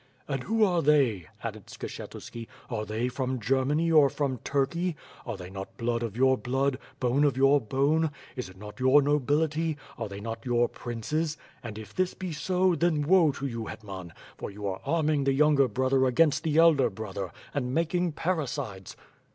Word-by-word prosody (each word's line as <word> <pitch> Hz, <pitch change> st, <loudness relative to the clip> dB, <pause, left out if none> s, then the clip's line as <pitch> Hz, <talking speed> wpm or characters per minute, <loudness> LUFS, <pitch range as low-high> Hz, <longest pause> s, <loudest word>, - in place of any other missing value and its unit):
"And 135 Hz, -3 st, -2 dB
who 225 Hz, +1 st, +2 dB
are 180 Hz, -4 st, +3 dB
they," 135 Hz, -, +3 dB, 0.2 s
added -, -, -6 dB
Skshetuski, 115 Hz, -1 st, -8 dB, 0.2 s
"Are 110 Hz, -2 st, -2 dB
they 110 Hz, +3 st, -1 dB
from 130 Hz, 0 st, -2 dB
Germany 135 Hz, +8 st, +1 dB
or 150 Hz, -3 st, +6 dB
from 135 Hz, -3 st, -2 dB
Turkey? 155 Hz, +7 st, 0 dB, 0.3 s
Are 115 Hz, -4 st, -3 dB
they 90 Hz, 0 st, -9 dB
not 95 Hz, 0 st, -8 dB
blood 115 Hz, 0 st, -1 dB
of 115 Hz, -2 st, -4 dB
your 130 Hz, 0 st, +4 dB
blood, 135 Hz, +1 st, 0 dB, 0.2 s
bone 130 Hz, +3 st, +2 dB
of 140 Hz, -3 st, +2 dB
your 135 Hz, +1 st, +5 dB
bone? 140 Hz, +7 st, +2 dB, 0.3 s
Is 125 Hz, -7 st, -5 dB
it 95 Hz, -, -15 dB
not 105 Hz, +4 st, -10 dB
your 130 Hz, +3 st, +5 dB
nobility; 150 Hz, +2 st, +1 dB, 0.2 s
are 110 Hz, -3 st, -3 dB
they 100 Hz, 0 st, -7 dB
not 115 Hz, +1 st, -5 dB
your 120 Hz, -1 st, +2 dB
princes? 150 Hz, +9 st, -3 dB, 0.2 s
And, 110 Hz, -3 st, -7 dB
if 110 Hz, -1 st, -9 dB
this 185 Hz, -1 st, 0 dB
be 185 Hz, -2 st, -5 dB
so, 185 Hz, +4 st, +2 dB
then 165 Hz, -3 st, +1 dB
woe 165 Hz, -1 st, +5 dB
to 140 Hz, -, -5 dB
you, 115 Hz, -4 st, -3 dB
llet 110 Hz, +1 st, -8 dB
man, 95 Hz, -4 st, -7 dB, 0.3 s
for -, -, -5 dB
you 105 Hz, +1 st, -8 dB
arc 95 Hz, -1 st, -3 dB
arming 155 Hz, -4 st, +1 dB
the 135 Hz, -, +3 dB
younger 145 Hz, -1 st, +4 dB
brother 130 Hz, +3 st, +2 dB
against 145 Hz, +3 st, +3 dB
the 155 Hz, -2 st, 0 dB
elder 155 Hz, -7 st, +6 dB
brother, 100 Hz, -3 st, -5 dB, 0.2 s
and 125 Hz, -3 st, -1 dB
making 170 Hz, +3 st, 0 dB
parricides? 140 Hz, -, -3 dB
135 Hz, 185 wpm, -28 LUFS, 115-155 Hz, 0.3 s, or